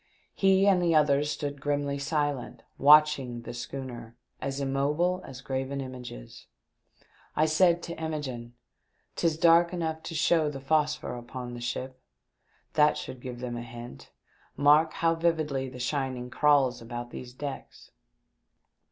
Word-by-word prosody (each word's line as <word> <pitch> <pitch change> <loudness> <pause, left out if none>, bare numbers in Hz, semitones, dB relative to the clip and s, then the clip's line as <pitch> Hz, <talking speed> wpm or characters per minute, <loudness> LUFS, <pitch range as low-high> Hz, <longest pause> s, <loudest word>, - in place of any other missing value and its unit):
He 195 0 +4
and 190 -3 +4
the 170 -2 +2
others 145 -1 +3
stood 145 -2 -4
grimly 145 -1 -1
silent 145 -3 -2 0.2
watching 140 -4 +5
the - - -7
schooner, 120 -2 -7 0.3
as 135 0 -3
immobile 145 +7 0
as 130 -1 -9
graven 135 +1 -3
images. 125 - -9 0.9
I 155 - +3
said 170 +2 +3
to 170 -1 -7
Imogene, 130 -7 -5 0.6
"'Tis 165 -2 +1
dark 170 +1 +5
enough 160 -3 -3
to 165 - -7
show 155 0 +3
the 140 -2 -6
phosphor 150 0 0
upon 120 0 -7
the 120 - -7
ship. 130 +2 -4 0.7
That 150 0 +4
should 130 -1 -7
give 125 -1 -7
them 125 -1 -4
a 120 - -4
hint. 120 +1 -10 0.5
Mark 150 +3 +5
how 165 0 +2
vividly 155 -5 0
the 125 - -10
shining 125 -1 -2
crawls 140 -5 +3
about 120 +1 -7
these 125 -1 -8
decks." 140 0 -8
140 Hz, 140 wpm, -28 LUFS, 125-155 Hz, 0.9 s, watching